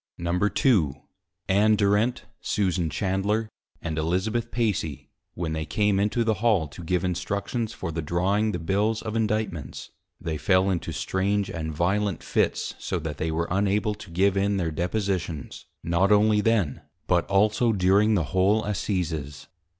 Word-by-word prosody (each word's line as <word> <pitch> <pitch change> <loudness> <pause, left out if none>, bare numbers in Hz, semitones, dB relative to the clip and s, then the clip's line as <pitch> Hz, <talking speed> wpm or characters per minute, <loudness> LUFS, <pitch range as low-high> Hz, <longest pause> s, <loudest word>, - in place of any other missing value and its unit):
II. 85 - -4 1.2
Ann 105 +3 +4
Durent, 105 +4 +2 0.2
Susan 90 -5 0
Chandler, 100 +6 0 0.4
and 80 -2 -2
Elizabeth 95 +8 -1
Pacy, 105 - -2 0.2
when 85 -2 -3
they 80 0 -2
came 105 +4 +1
into 105 +4 +1
the 110 -1 +2
Hall, 105 -9 +3
to 85 +5 -10
give 90 +2 0
Instructions 100 +5 -2
for 95 -6 -5
the 80 +1 -3
drawing 95 +7 +1
the - - -2
Bills 100 +6 0
of 110 -1 -4
Indictments, 105 - -2 0.3
they 80 -2 -3
fell 95 +4 +3
into 85 -3 -2
strange 100 +1 -1
and 80 -1 -4
violent 95 +4 0
Fits, - - 0
so 95 - -2
that 80 -3 -5
they 80 - -2
were 85 +1 -1
unable 105 +3 +1
to 105 -2 -11
give 95 +3 +2
in 100 +1 +1
their 85 -4 -1
Depositions, 90 -3 -3 0.2
not 85 +4 +2
only 105 0 +4
then, 105 -10 +1 0.2
but 90 -1 +1
also 105 +4 +3
during 100 +2 +3
the 90 - +2
whole 100 +4 +3
Assizes. 85 -8 -3
95 Hz, 150 wpm, -25 LUFS, 85-105 Hz, 1.2 s, Ann